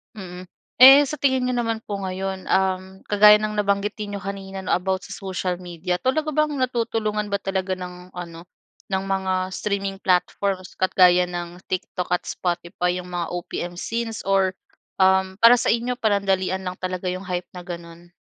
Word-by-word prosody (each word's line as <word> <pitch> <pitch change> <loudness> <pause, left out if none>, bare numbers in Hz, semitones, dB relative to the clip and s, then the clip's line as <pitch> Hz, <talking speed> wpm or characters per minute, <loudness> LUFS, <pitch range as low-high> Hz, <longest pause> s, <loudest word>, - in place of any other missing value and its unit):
Mm. 180 -2 -8 0.4
Eh, 270 +2 +11
sa - - -3
tingin 260 -3 +1
niyo 250 - 0
naman 225 -2 -1
po 205 - -4
ngayon, 190 0 -4
uhm, 190 0 0
kagaya 210 0 +7
ng 215 0 -2
nabanggitin 205 +1 -1
ninyo - - -6
kanina, 195 0 -6
'no, 190 - 0
about 190 +1 -1
sa 195 - -8
social 185 -2 -3
media, 180 +1 -3
talaga 305 +8 0
bang 305 -1 +2
natutulungan 225 -4 -1
ba 200 - +2
talaga 190 -1 -2
ng 180 0 -9
ano, 170 -1 -8 0.5
ng 190 0 +1
mga 190 -1 0 0.2
streaming 200 -1 -2
platforms, 185 +1 0
at 185 - +2
gaya 180 -1 +6
ng 175 0 -6
TikTok 180 -1 -4
at 180 - 0
Spotify, 180 0 -2
yung 180 - -11
mga 175 -1 -3
OPM 175 0 -4
scenes, 225 0 -3
or, 195 -1 +3 0.5
uhm, 190 0 +3
para 230 +1 +9
sa - - +1
inyo 240 +2 0
panandalian 195 -4 +1
lang 180 0 -4
talaga 185 0 -4
yung 185 +2 -4
hype 180 -1 -4
na 180 - -7
ganun? 170 -1 -9
190 Hz, 170 wpm, -23 LUFS, 180-210 Hz, 0.5 s, Eh